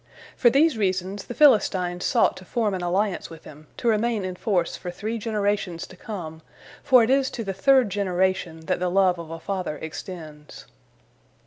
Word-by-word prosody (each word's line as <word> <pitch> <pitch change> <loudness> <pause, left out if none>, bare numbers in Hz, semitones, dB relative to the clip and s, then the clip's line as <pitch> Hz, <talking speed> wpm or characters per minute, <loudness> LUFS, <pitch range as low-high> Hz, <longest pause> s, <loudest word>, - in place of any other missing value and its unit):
For 240 - +5
these 275 0 +3
reasons, 190 0 -1
the 245 - -7
Philistines 190 - +3
sought - - +3
to 185 - -11
form 215 +2 -1
an 185 - -3
alliance 190 +2 -1
with 165 -1 -12
him, 150 +1 -14
to 240 - -3
remain 220 -2 +1
in 185 -1 -4
force 180 -4 -1
for 180 - -7
three 220 +6 -4
generations 205 -5 -1
to 185 - -14
come, 170 -6 -7 0.4
for 255 -4 +5
it 225 - +1
is 270 -1 +3
to 230 - -5
the 195 -2 -3
third 255 +2 +3
generation 185 -4 -1
that 160 - -2
the 180 0 0
love 185 -1 +3
of 165 -2 -8
a 165 0 -7
father 185 -4 -4
extends. 155 -2 -9
190 Hz, 185 wpm, -24 LUFS, 175-220 Hz, 0.4 s, For